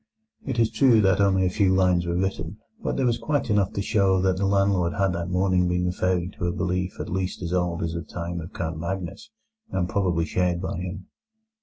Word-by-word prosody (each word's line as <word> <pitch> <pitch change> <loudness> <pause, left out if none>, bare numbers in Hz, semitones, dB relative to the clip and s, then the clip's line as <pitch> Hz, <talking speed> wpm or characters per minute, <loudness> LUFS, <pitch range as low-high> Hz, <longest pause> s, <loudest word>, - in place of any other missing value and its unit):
It - - -3
is 115 -1 +3
true 120 -1 +5
that 95 0 +3
only 95 -1 +3
a - - +2
few 95 -1 +2
lines 90 -2 +2
were 85 - -1
written, 95 0 -2 0.2
but - - -2
there 135 - +1
was 120 -1 +1
quite 145 -5 -1
enough 100 -2 +2
to 100 - -2
show 100 -3 +2
that 95 -1 +2
the 100 0 +1
landlord 100 -3 +2
had 95 -2 +1
that 85 0 -3
morning 90 0 +2
been 90 0 0
referring 90 0 0
to 90 - 0
a - - +1
belief 90 0 -2
at - - -4
least 95 0 -3
as 85 0 -3
old 90 -2 0
as 80 -1 -2
the 85 - -3
time 85 +2 -5
of 80 - -9
Count 80 -2 -4
Magnus, 95 - -5 0.4
and 90 -2 -1
probably 90 -4 0
shared 90 +1 0
by 90 - -3
him. 90 +1 -6
95 Hz, 220 wpm, -25 LUFS, 90-100 Hz, 0.4 s, true